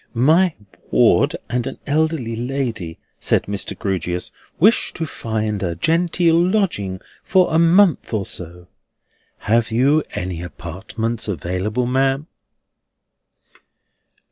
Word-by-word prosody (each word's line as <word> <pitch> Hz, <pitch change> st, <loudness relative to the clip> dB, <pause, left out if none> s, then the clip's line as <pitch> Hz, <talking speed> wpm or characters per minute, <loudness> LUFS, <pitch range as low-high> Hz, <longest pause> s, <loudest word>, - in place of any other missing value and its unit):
"My 160 Hz, +8 st, +4 dB, 0.3 s
ward -, -, +4 dB
and 125 Hz, 0 st, -2 dB
an -, -, -6 dB
elderly 150 Hz, -6 st, 0 dB
lady," 115 Hz, -8 st, -3 dB, 0.2 s
said -, -, +2 dB
Mr. 100 Hz, -1 st, -4 dB
Grewgious, 90 Hz, -2 st, -2 dB, 0.3 s
"wish 215 Hz, +8 st, +4 dB
to 165 Hz, -, -3 dB
find 110 Hz, -7 st, -3 dB
a 85 Hz, -3 st, -2 dB
genteel 165 Hz, -, +2 dB
lodging 175 Hz, -, 0 dB, 0.2 s
for 185 Hz, -3 st, +3 dB
a 160 Hz, -, +4 dB
month 170 Hz, +1 st, +4 dB
or 105 Hz, -4 st, -1 dB
so. 90 Hz, 0 st, -7 dB, 0.7 s
Have 115 Hz, +1 st, +2 dB
you 135 Hz, +7 st, +3 dB
any 90 Hz, -2 st, -3 dB
apartments 95 Hz, +7 st, -5 dB
available, 95 Hz, -, -2 dB
ma'am?" 135 Hz, +3 st, +1 dB
115 Hz, 110 wpm, -20 LUFS, 95-160 Hz, 0.7 s, My